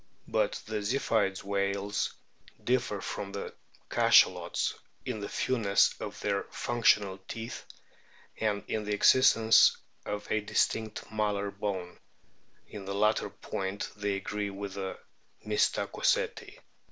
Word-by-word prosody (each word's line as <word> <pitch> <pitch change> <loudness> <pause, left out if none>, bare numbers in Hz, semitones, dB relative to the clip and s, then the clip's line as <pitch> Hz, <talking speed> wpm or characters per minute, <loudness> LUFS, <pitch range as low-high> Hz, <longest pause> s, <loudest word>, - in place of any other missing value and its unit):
But - - +1
the 110 0 -3
Ziphioid 105 -3 0
whales 100 +1 -1 0.5
differ 120 -5 0
from 100 -1 -5
the 100 - -5 0.3
Cachalots - - +4 0.3
in 110 - -3
the 100 - -5
fewness 110 -6 +2
of - - -6
their - - 0
functional 105 -5 +2
teeth 115 0 -6 0.7
and 105 -2 0
in 110 - -2
the 105 0 0
existence 115 0 +6 0.3
of 105 0 -4
a 110 - +2
distinct 110 +1 -1
malar 105 -2 -1
bone; 95 -3 -4 0.7
in 100 -2 -9
the 100 0 -4
latter 105 +2 +2
point 95 +1 -4
they 100 -1 -1
agree 105 +1 -3
with 100 0 -6
the 95 -1 -4 0.5
Mystacoceti. 105 0 0
105 Hz, 115 wpm, -30 LUFS, 100-110 Hz, 0.7 s, existence